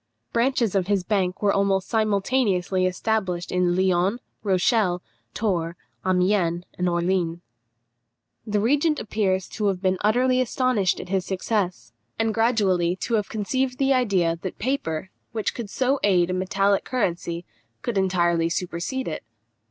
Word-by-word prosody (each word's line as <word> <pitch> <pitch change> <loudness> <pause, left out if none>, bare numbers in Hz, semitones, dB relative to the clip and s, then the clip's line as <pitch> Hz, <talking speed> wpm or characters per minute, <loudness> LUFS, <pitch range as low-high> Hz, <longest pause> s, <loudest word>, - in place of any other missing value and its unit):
Branches 235 -3 +2
of 190 -3 +1
his 200 -2 +1
bank 190 0 -1
were 200 - +4
almost 195 -1 +1
simultaneously 200 -4 +1
established 185 -2 -1
at 180 - +1
Lyons, 185 +4 +2 0.2
Rochelle, 190 -1 +2 0.4
Tours, 170 -6 -1 0.3
Amiens, 180 -2 +2
and 180 0 0
Orleans. 175 -1 0 1.1
The 210 -1 +1
regent 290 +7 +2
appears 190 -4 0
to 210 - -1
have 195 -2 0
been 185 -1 0
utterly 255 +4 +3
astonished 250 -6 +1
at 180 - -8
his 190 -1 +1
success, 185 - -2 0.2
and 225 -1 +1
gradually 200 -7 +2
to 210 +5 -4
have 210 -3 +1
conceived 250 +4 -1
the 275 0 +3
idea 185 -10 +1
that 185 - -5
paper, 190 - -2 0.2
which 220 -2 -1
could 230 -4 -6
so 265 +5 +1
aid 180 -3 +3
a - - 0
metallic 195 +2 +1
currency, 175 -7 -2 0.4
could 240 - -2
entirely 175 -3 +2
supersede 180 - -3
it. 155 - -4
195 Hz, 140 wpm, -24 LUFS, 180-225 Hz, 1.1 s, were